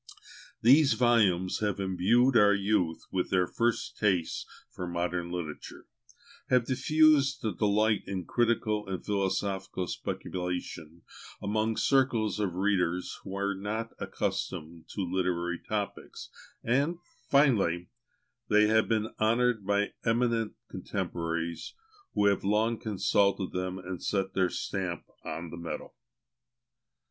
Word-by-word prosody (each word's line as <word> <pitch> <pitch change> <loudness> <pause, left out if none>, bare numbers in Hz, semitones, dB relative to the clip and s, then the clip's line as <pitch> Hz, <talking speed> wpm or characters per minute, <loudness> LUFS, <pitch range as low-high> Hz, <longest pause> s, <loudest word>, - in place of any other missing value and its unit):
These 140 +4 +6
volumes 105 -7 +3
have 105 -2 -1
imbued 100 +7 +3
our 105 -2 +6
youth 95 -5 0
with 90 -1 -1
their 90 -1 +3
first 120 +5 -1
tastes 95 -6 0 0.2
for 90 - -6
modern 85 0 -2
literature, 85 -4 -6 0.6
have 125 -2 +4
diffused 140 0 +3
a 110 - 0
delight 105 0 +2
in 95 -2 -4
critical 110 -2 0
and 95 -1 -5
philosophical 95 -2 -1
speculation 90 -3 -5 0.4
among 110 +2 -1
circles 125 -6 +2
of 95 -4 -1
readers 90 -2 0
who - - -10
were 100 +1 -1
not 105 +4 -4
accustomed 80 +1 -4
to 100 - -2
literary 90 -1 -1
topics; 105 -2 -5 0.3
and 140 +8 +1 0.3
finally, 100 - +3 0.6
they 105 0 +5
have 110 +1 +3
been 110 -1 0
honoured 115 -1 +2
by 100 0 +1
eminent 115 -1 +1
contemporaries, 85 0 -4 0.4
who 105 - +3
have 100 -1 +3
long 110 +3 +1
consulted 100 -2 +1
them 90 0 -3
and 90 -1 -7
set 95 -1 -1
their 95 -2 +2
stamp 95 -4 -3 0.2
on 80 +1 -5
the 85 - -7
metal. 85 0 -6
100 Hz, 120 wpm, -29 LUFS, 90-110 Hz, 0.6 s, These